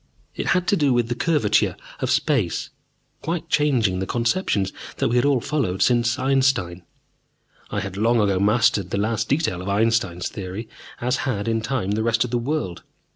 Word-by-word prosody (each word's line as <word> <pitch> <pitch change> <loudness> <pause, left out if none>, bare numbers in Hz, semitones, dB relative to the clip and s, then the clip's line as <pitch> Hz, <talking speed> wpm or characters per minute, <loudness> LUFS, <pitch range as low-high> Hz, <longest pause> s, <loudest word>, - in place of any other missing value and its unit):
It - - -3
had 180 - -1
to - - +4
do 145 -7 +2
with 120 -1 +1
the - - +1
curvature 130 -6 +1 0.2
of - - -2
space, - - 0 0.5
quite 165 +1 -3
changing 120 -11 +2
the 95 - -3
conceptions 115 - 0 0.2
that - - +1
we 120 - 0
had 125 - +3
all 140 -3 +3
followed 110 -9 -1
since 120 -1 +2
Einstein. 130 -10 +1 0.9
I 100 - -2
had 95 0 -6
long 115 +3 +3
ago 100 -3 +2
mastered 100 -2 +2
the - - -2
last 110 +2 -1
detail 140 - 0
of 95 - -5
Einstein's 100 -4 +1
theory, 100 +3 -6 0.3
as 125 +2 +1
had, 105 -4 -2
in 115 0 0
time, 110 -4 -2
the 105 +1 0
rest 115 +1 +2
of 120 - -5
the 120 - +1
world. 125 - -3
115 Hz, 185 wpm, -23 LUFS, 100-130 Hz, 0.9 s, to